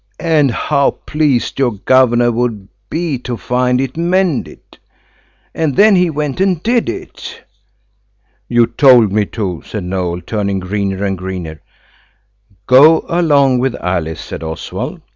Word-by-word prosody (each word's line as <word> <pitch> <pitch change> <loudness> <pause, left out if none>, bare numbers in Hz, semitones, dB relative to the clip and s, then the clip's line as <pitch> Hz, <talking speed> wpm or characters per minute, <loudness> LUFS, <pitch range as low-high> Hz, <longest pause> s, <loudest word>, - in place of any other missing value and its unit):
And 155 -4 +2
how 140 +3 0
pleased 145 -6 0
your 125 -4 +1
governor 120 +2 +3
would 115 -4 -2 0.2
be 160 -5 -2
to 125 -1 -5
find 125 +1 0
it 130 -1 -3
mended. 175 -2 -2 0.7
And 155 -5 -1
then 210 0 +5
he 180 -1 +2
went 150 +1 -3
and 185 -4 0
did 235 +1 +1
it." - - -8 1.1
"You 120 -1 +4
told 125 -5 +4
me 105 +1 +1
to," 95 -7 -4
said 105 -4 -6
Noël, 90 -1 -3
turning 100 -3 -2
greener 95 +1 -3
and 95 -2 -2
greener. 90 -4 -6 1.0
"Go 150 +6 +6
along 145 -7 +2
with 130 0 -1
Alice," 85 -3 -3
said - - -8
Oswald. 80 0 -6
125 Hz, 135 wpm, -15 LUFS, 100-150 Hz, 1.1 s, Go